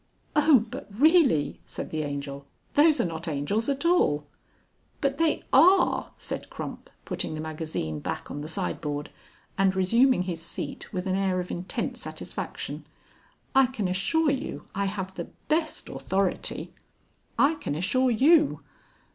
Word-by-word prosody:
"Oh! 295 -6 +5
but 260 - -7
really!" 270 - +3
said - - -6
the 155 - -1
Angel, 140 -1 -5 0.3
"those 305 +1 +5
are - - +2
not 165 0 -4
angels 160 - -1
at 280 +3 -1
all." 150 - +3 0.7
"But 275 0 0
they 325 -1 +2
are," 360 +8 +5
said - - -5
Crump, - - -7 0.2
putting - - -3
the - - -5
magazine 155 - -4
back - - -5
on 145 - -5
the 150 - -5
sideboard 150 -2 -3 0.5
and 190 -1 +3
resuming 230 +4 +4
his 175 -3 -4
seat 170 - -6
with 185 -1 -3
an 190 - 0
air 190 -1 +1
of 180 - -4
intense 180 +2 -3
satisfaction. - - -6 0.7
"I 270 -1 +6
can 225 -6 -2
assure 290 - +2
you 275 +1 -4
I 200 +1 0
have 190 -1 -3
the 170 - -5 0.2
best 315 0 0
authority...." 180 +8 -1 0.6
"I 285 +3 +5
can 300 - -4
assure 255 +11 +2
you...." 295 +6 +4
195 Hz, 145 wpm, -27 LUFS, -, 0.7 s, I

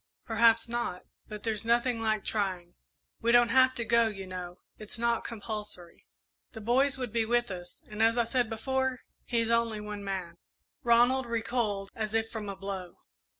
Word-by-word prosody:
Perhaps 230 0 +4
not, 235 -6 -3 0.2
but 210 -1 -8
there's 220 -2 -1
nothing 235 0 +2
like 215 -2 0
trying. 185 -5 -2 0.5
We 235 - +3
don't 240 0 +6
have 260 +1 +5
to 235 - -2
go, 235 0 +4
you 195 -3 -5
know 180 -1 -7 0.2
it's 215 +2 -8
not 235 0 +1
compulsory. 210 -6 -7 0.5
The 220 - -7
boys 260 +5 +2
would 250 -4 -4
be 230 -1 +2
with 240 0 +1
us, 175 -1 -8
and, 210 +1 -5
as 225 +1 +4
I 240 - +4
said 240 0 0
before, 260 +3 -1 0.2
he's 230 -1 0
only 230 -2 +2
one 210 -1 -6
man." 185 -4 -4 0.4
Ronald 240 +2 +4
recoiled 220 -4 -1
as 215 -1 -3
if 225 0 0
from 215 -3 -5
a 200 - -4
blow. 190 -2 -6
225 Hz, 175 wpm, -30 LUFS, 205-235 Hz, 0.5 s, don't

